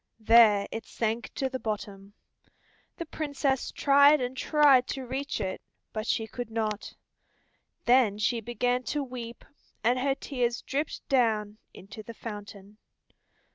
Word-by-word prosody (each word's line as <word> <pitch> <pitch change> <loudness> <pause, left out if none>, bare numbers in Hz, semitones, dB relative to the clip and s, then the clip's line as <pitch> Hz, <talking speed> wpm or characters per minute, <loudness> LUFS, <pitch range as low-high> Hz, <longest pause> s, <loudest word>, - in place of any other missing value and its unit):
There 220 -2 +6
it 225 - -6
sank 225 0 -2
to 270 - -1
the 260 0 -5
bottom. 200 -3 -5 0.8
The 335 - -5
Princess 285 -4 -2
tried 285 +1 +5
and 250 0 -3
tried 275 -2 +4
to 265 -2 -4
reach 270 +3 -3
it, 185 0 -3 0.3
but 215 +1 -4
she 225 - 0
could 230 +2 -6
not. 220 -2 -3 0.9
Then 240 -4 +4
she 230 +2 0
began 245 +2 -1
to 295 -1 -1
weep, 240 -3 -8 0.4
and 245 +3 +2
her 270 +1 +1
tears 245 -4 -2
dripped 290 +3 -3
down 215 -5 +1
into 205 +3 -11
the 230 +2 -10
fountain. 205 -1 -9
240 Hz, 135 wpm, -28 LUFS, 215-265 Hz, 0.9 s, There